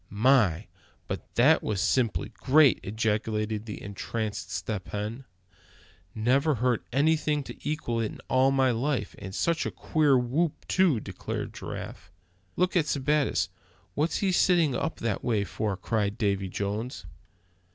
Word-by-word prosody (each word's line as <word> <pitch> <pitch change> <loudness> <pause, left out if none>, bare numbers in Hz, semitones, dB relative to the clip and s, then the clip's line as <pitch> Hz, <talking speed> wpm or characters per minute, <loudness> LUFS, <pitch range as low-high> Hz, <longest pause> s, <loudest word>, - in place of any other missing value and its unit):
"My! 105 -5 +3 0.4
but - - -6
that - - +5
was 105 -3 -2
simply 120 +2 +1
great!" 145 0 +4
ejaculated 110 0 -1
the 105 - -6
entranced 105 +1 -4
Step 95 +1 -4
Hen. 110 +6 -5 0.9
"Never 135 +7 +2
heard 125 0 +1
anything 150 +2 +2
to - - -7
equal 135 -7 -2
it 110 - 0
in - - -11
all 130 +1 +4
my 135 -1 +3
life; 130 +3 -1
and 95 0 -7
such 170 -2 +1
a - - -2
queer 150 -4 +2
whoop 140 +7 -1
too!" 180 -10 +3
declared - - -5
Giraffe. - - -8 0.4
"Look 180 +1 +1
at 165 -4 +3
Sebattis; 150 +1 +1 0.4
what's 155 +3 0
he 190 - +3
sitting 175 -5 +3
up 160 +6 -2
that 115 -4 -1
way 110 -4 +1
for?" 100 0 -3
cried 105 +1 -1
Davy 100 -4 0
Jones. 105 +6 -4
120 Hz, 140 wpm, -27 LUFS, 105-145 Hz, 0.9 s, that